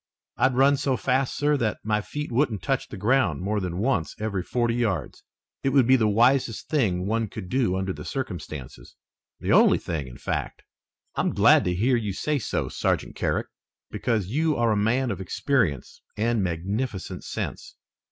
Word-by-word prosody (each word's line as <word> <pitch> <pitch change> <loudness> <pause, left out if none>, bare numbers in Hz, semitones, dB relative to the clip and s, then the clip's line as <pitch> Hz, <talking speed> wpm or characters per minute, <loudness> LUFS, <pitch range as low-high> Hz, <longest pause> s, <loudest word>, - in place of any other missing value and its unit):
I'd 130 -1 +2
run 140 +2 +5
so 135 -2 0
fast, 130 +1 0
sir, 145 0 +2
that 110 -5 -1
my 105 0 +1
feet 150 +6 -5
wouldn't 120 -4 0
touch 135 -2 -1
the 105 - -8
ground 105 - +2
more 105 +2 0
than 90 -3 -3
once 100 - 0
every 105 -3 -2
forty 120 +4 0
yards. 105 - -2 0.4
It 135 - +1
would 135 -4 +5
be 130 +2 +6
the 110 -4 +3
wisest 120 +2 +2
thing 95 - +1
one 110 +2 0
could 95 -2 -8
do 120 -7 +1
under 95 0 -2
the - - -8
circumstances, 80 - -6 0.4
the - - -2
only - - +6
thing, 75 -5 -4
in - - -11
fact." - - -4 0.5
"I'm - - -1
glad - - +5
to 90 - 0
hear 120 +7 +2
you 105 -4 -2
say 150 +8 -1
so, - - -2
Sergeant - - -1
Carrick, - - -1 0.5
because 110 -5 0
you 150 - 0
are 120 -1 +2
a - - +2
man 120 +5 +1
of - - -4
experience 95 - -1 0.2
and 115 +1 +1
magnificent 95 +5 -3
sense. - - -5
110 Hz, 180 wpm, -25 LUFS, 95-130 Hz, 0.5 s, be